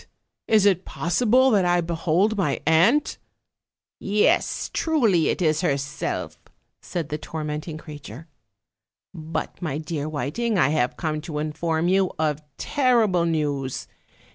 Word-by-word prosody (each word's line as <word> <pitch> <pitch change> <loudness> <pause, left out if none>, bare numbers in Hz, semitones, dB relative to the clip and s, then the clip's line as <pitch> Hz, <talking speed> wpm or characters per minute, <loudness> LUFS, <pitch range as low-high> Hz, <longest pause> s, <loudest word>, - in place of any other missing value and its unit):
is 215 -2 +4
it 190 -2 +3
possible 245 +9 +2
that 200 -4 +3
I 175 0 +3
behold 170 +5 +1
my 165 -9 0
aunt?" 180 - +3 0.8
"Yes, 205 +1 +1
truly, 230 - +2
it - - -1
is 155 0 +2
herself," 140 -3 -2 0.4
said 165 -4 -4
the 150 0 -3
tormenting 155 0 -5
crea 150 -2 -10
ture. 140 +4 -11 0.9
"But, 160 +3 -5
my 155 -5 -2
dear 155 -1 -4
Whiting, 155 - -2
I 135 -5 +4
have 145 -5 0
come 155 -2 -2
to 155 -2 -6
inform 160 +2 -1
you 190 0 +2
of 155 -1 0 0.2
terrible 230 - +2
news. 145 -5 -2
165 Hz, 130 wpm, -24 LUFS, 150-195 Hz, 0.9 s, is